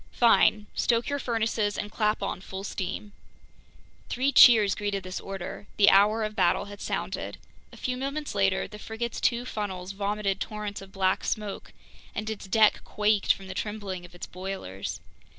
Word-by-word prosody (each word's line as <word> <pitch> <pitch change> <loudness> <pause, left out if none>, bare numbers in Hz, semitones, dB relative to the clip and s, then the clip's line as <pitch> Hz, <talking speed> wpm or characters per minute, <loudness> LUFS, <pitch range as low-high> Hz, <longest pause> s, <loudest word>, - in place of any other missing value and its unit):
"Fine. 215 -3 +4
Stoke 235 +2 +1
your 285 0 -1
furnaces 220 -4 0
and 210 - -4
clap 210 -2 0
on 195 -1 -3
full 190 0 -7
steam!" 200 +1 -4 1.0
Three 260 +3 +1
cheers 220 -8 +8
greeted 205 -2 -2
this 185 0 -5
order. 195 +1 -7
The 200 -1 +7
hour 210 +3 +5
of 215 0 -3
battle 180 -1 +2
had 205 0 -10
sounded. - - -3 0.3
A - - -13
few 255 - -2
moments 280 +3 -3
later, 195 -1 +1
the 210 - -11
frigate's 225 +2 -4
two 240 0 +1
funnels 190 -5 -4
vomited 200 0 -1
torrents 210 -2 -4
of 195 0 -12
black 190 -2 +1
smoke, 210 -2 -3 0.4
and 215 +1 -3
its 205 -2 -7
deck 215 +2 +4
quaked 210 -1 +2
from 195 - -2
the 190 - -6
trembling 205 -3 -4
of 175 0 -13
its 175 - -6
boilers. 180 - -6
205 Hz, 170 wpm, -27 LUFS, 195-220 Hz, 1.0 s, cheers